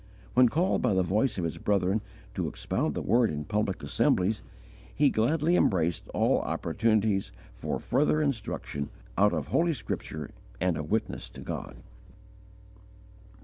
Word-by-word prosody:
When 125 -1 +6
called 175 +9 +1
by 115 -6 +2
the 95 - +3
voice 110 +7 +1
of 90 - -1
his 80 - -3
brethren 100 +1 +1 0.3
to - - -2
expound - - -2
the - - -2
Word 120 -1 +3
in 75 0 -3
public 105 +1 -1
assemblies, 100 +4 +1 0.5
he 145 -1 +4
gladly 155 +9 +2
embraced 85 - +1
all - - +2
opportunities 110 -3 +1 0.2
for - - -3
further 150 +4 +2
instruction 110 - -2 0.3
out 105 +1 +4
of - - -3
Holy 170 0 +2
Scripture 75 - -5 0.3
and 90 -1 +1
of 75 0 -5
witness 110 - -1
to - - -11
God. - - -5
105 Hz, 145 wpm, -28 LUFS, 90-130 Hz, 0.5 s, When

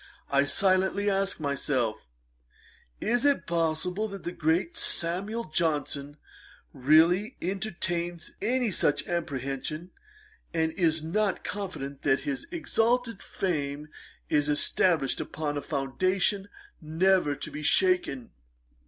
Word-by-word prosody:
I 140 0 +4
silently 190 +5 +2
asked 195 -1 0
myself, 130 - -1 0.9
'Is 240 +3 +1
it 285 -1 +3
possible 170 +4 0
that 195 -2 -8
the 175 - -3
great 170 - 0
SAMUEL 200 - -1
JOHNSON 145 -3 -1 0.6
really 165 - +4
entertains 175 -3 -3
any 245 -2 +1
such 145 -4 +1
apprehension, 155 0 -3 0.6
and 160 -1 +1
is 160 -2 +1
not 200 +5 0
confident 160 -9 -5
that 135 -1 +2
his 140 -2 -4
exalted 245 - 0
fame 150 -4 -3 0.4
is 150 -1 +2
established 150 0 +2
upon 150 -2 -3
a 145 - -2
foundation 185 +9 0 0.3
never 165 0 +2
to - - -7
be 150 - -6
shaken?' 360 - +2
170 Hz, 110 wpm, -28 LUFS, 145-195 Hz, 0.9 s, I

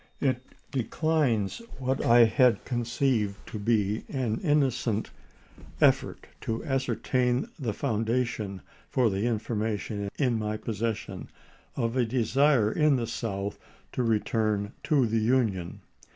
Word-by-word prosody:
"It 130 -3 +1 0.3
declines 130 -5 0 0.2
what 130 0 -1
I 120 0 +7
had 125 +1 +3
conceived 120 -4 0
to 110 - -6
be 105 -1 +1
an 125 -6 -1
innocent 130 - +1 0.7
effort - - +2 0.2
to 115 +5 -3
ascertain 130 - 0
the 120 -6 -1
foundation 115 -4 -1 0.3
for 130 - +2
information 105 -1 -2
in 125 -5 +1
my 105 0 -2
possession 110 0 -4 0.5
of 115 +1 -1
a 130 - +3
desire 125 0 +3
in 150 0 +3
the 120 -2 -1
South 100 -3 -4 0.3
to - - -2
return 110 -2 0
to 140 -5 +3
the 115 0 +1
Union. 110 -7 0
115 Hz, 115 wpm, -28 LUFS, 110-130 Hz, 0.7 s, I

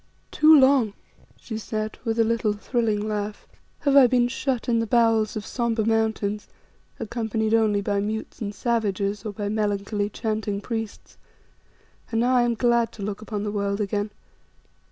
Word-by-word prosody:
"Too 310 0 +7
long," 260 -6 +4 0.5
she 220 -2 -6
said, 215 0 -4
with 225 0 -1
a 230 - +5
little 225 -2 +1
thrilling 215 -1 -1
laugh, 210 -1 -4 0.3
"have 280 -1 +2
I 270 -3 +8
been 245 0 +3
shut 260 -1 -2
in 230 -1 +2
the 225 - -1
bowels 225 -2 +2
of 215 - -4
sombre 235 -3 -1
mountains, 220 -2 0 0.5
accompanied 225 -1 -2
only 215 -3 +3
by 200 0 0
mutes 215 +3 -4
and 205 -2 -2
savages 205 -3 -1
or - - -3
by 205 0 -4
melancholy, 205 -1 -1
chanting 215 -2 -2
priests, 225 0 -6 0.9
and 225 - 0
now 250 +2 +2
I 245 - +5
am 240 -1 +1
glad 235 -1 +2
to 205 - -8
look 205 +1 -4
upon 210 -1 -4
the 210 - -2
world 200 0 -1
again. 205 0 -1
220 Hz, 165 wpm, -24 LUFS, 205-235 Hz, 0.9 s, I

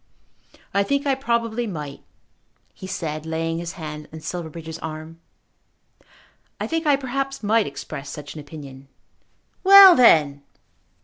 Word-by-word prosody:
"I 200 - +3
think 280 +7 -1
I 275 - +2
probably 235 -3 -1
might," 150 -7 -7 0.7
he 190 - -10
said, 155 -4 -4
laying 165 +1 -3
his 170 +1 -6
hand 150 -3 -8
on 160 - -9
Silverbridge's 160 -1 -7
arm. 160 +1 -8 1.4
"I - - -2
think 325 -1 -2
I 290 - +5
perhaps 275 0 -4
might 220 +1 +2
express 140 0 -8
such 145 -1 -8
an 155 - -9
opinion." 140 -3 -11 0.8
"Well 390 -1 +10
then!" 150 - +5
165 Hz, 130 wpm, -22 LUFS, 150-240 Hz, 1.4 s, Well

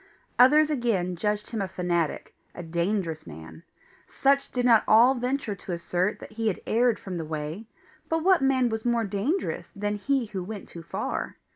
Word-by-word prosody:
Others 300 +5 +6
again 215 -10 0
judged 210 +3 -2
him 225 -3 -2
a 195 - -1
fanatic 175 -3 -2 0.2
a 175 - -7
dangerous 170 - -2
man. 80 0 -11 0.5
Such 275 0 +1
did 245 -1 -1
not 230 -3 +6
all 235 +4 +6
venture 250 -2 -2
to 190 -2 -7
assert 175 +3 -1
that - - -11
he 225 +1 -2
had 200 - 0
erred 235 0 +2
from 185 -3 -6
the - - -3
way, 155 +6 -5 0.4
but 325 0 0
what 375 -3 +4
man 260 -2 +3
was 220 -1 -3
more 235 -1 +1
dangerous 210 - -2
than 205 +1 -2
he 270 +3 0
who 200 -4 -5
went 205 +1 -7
too 170 - -10
far? 160 - -4
210 Hz, 180 wpm, -26 LUFS, 175-245 Hz, 0.5 s, Others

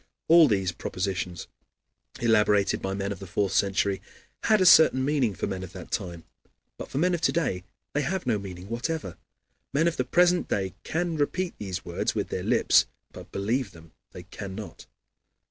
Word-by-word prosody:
All 165 -1 +8
these 95 -6 +1
propositions, 90 0 -4 0.7
elaborated 105 -3 +3
by 95 0 -2
men 100 0 -3
of 100 - -5
the 95 - -9
fourth 100 +2 0
century, 100 0 +1 0.4
had 215 -1 +4
a 185 - +3
certain 145 -6 +7
meaning 135 -8 +1
for - - -3
men 95 -2 -4
of 95 - -8
that - - -10
time, 85 -2 -4 0.6
but - - -7
for - - -5
men 180 +4 +2
of 170 - -1
to - - +3
day 120 - -1 0.3
they 150 - +1
have 175 +3 -2
no 115 -4 +1
meaning 95 -2 -8
whatever. 120 - -3 0.6
Men 155 +4 +3
of 170 - -1
the 130 - +1
present 175 +6 +3
day 95 -2 -1
can 170 0 -2
repeat 175 +5 -1
these 95 -3 -5
words 85 - -2
with - - -2
their - - -3
lips, - - +4 0.2
but - - -12
believe 110 +4 -1
them 80 -1 -15 0.2
they - - -10
cannot. 100 +1 -8
105 Hz, 180 wpm, -26 LUFS, 95-155 Hz, 0.7 s, All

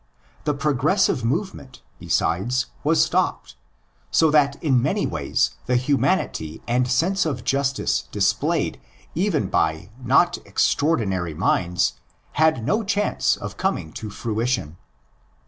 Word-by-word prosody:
The 150 - +1
progressive 150 - +1
move 170 - -1
ment, 130 -3 -13 0.2
besides, 120 +9 0 0.2
was 160 +2 +4
stopped; - - -1 0.5
so 160 - +3
that 145 -2 +3
in 135 -6 +3
many - - 0
ways 60 - 0 0.2
the 125 - +2
humanity 130 - 0
and 125 +1 +1
sense 170 +10 +1
of 135 -7 -3
justice 140 0 0
displayed - - 0 0.3
even 175 -3 0
by 80 +4 -1
not 140 +8 +3
extraordinary 95 - 0
minds 90 0 0 0.3
had 155 -7 +2
no 215 - +1
chance 205 0 +1
of - - -7
coming 80 - -2
to 110 - -6
fruition. 110 -6 -2
130 Hz, 120 wpm, -23 LUFS, 110-160 Hz, 0.5 s, was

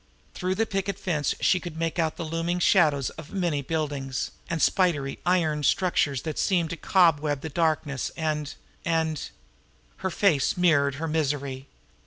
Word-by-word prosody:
Through 185 0 -2
the 225 - +1
picket 195 -2 -2
fence 150 -6 -1
she 185 - +3
could 170 -3 -8
make 165 +1 -2
out 160 -1 0
the 170 - -4
looming 165 +2 -1
shadows 155 -7 +3
of 155 - -15
many 175 -7 0
buildings, 140 -3 -3 0.2
and 170 - -1
spidery 150 -7 +1
iron 160 -4 +2
structures 145 -4 +1
that 155 -2 -4
seemed 175 -4 +1
to - - -2
cobweb 155 -5 +2
the 160 - -5
darkness, 150 -4 0
and 150 -2 -2 0.3
and 160 -2 -1 0.7
Her 190 - -2
face 180 -7 +2
mirrored 145 -6 +3
her 160 +3 -3
misery. 140 -4 -2
160 Hz, 155 wpm, -26 LUFS, 145-175 Hz, 0.7 s, she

